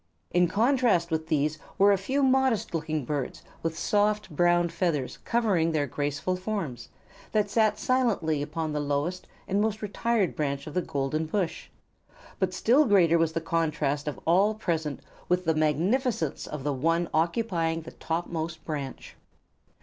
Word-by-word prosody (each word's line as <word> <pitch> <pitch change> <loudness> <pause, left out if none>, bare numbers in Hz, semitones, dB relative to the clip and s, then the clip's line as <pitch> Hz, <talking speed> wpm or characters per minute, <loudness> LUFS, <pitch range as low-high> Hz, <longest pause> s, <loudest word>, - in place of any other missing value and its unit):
In 175 0 +4
strong 215 +6 +1
contrast 230 -11 +2
with 160 0 -1
these 150 0 0 0.2
were 200 +1 +6
a - - +5
few 270 +9 0
modest 260 -7 +2
looking 155 -3 -2
birds 140 -1 -3 0.2
with 165 -1 -2
soft 210 -2 +1
brown 175 +1 +3
feathers 165 -5 -1
covering 200 -9 +2
their 150 -2 +1
graceful 145 +6 -2
forms, 180 - -4 0.4
that 210 -2 +1
sat 215 -1 +3
silently 215 - +1
upon 155 +1 -3
the 150 - -1
lowest 145 +5 -2 0.2
and 200 +2 +1
most 215 0 -1
retired 210 -1 0
branch 140 -2 -2
of 150 - -8
the 180 - +1
golden 145 +1 -2
bush; 180 0 -2 0.7
but 190 -2 +1
still 250 +10 +4
greater 175 -7 +4
was 165 -1 +1
the 165 - -1
contrast 155 -3 -1
of 150 - -3
all 195 +6 +4
present 160 -8 -2 0.3
with 180 0 +1
the 160 - +3
magnificence 165 - 0
of 150 -3 -6
the 145 0 0
one 165 +6 +1
occupying 165 -1 0
the - - -9
topmost 165 -1 -4
branch. 145 -4 -5
170 Hz, 155 wpm, -27 LUFS, 155-205 Hz, 0.7 s, were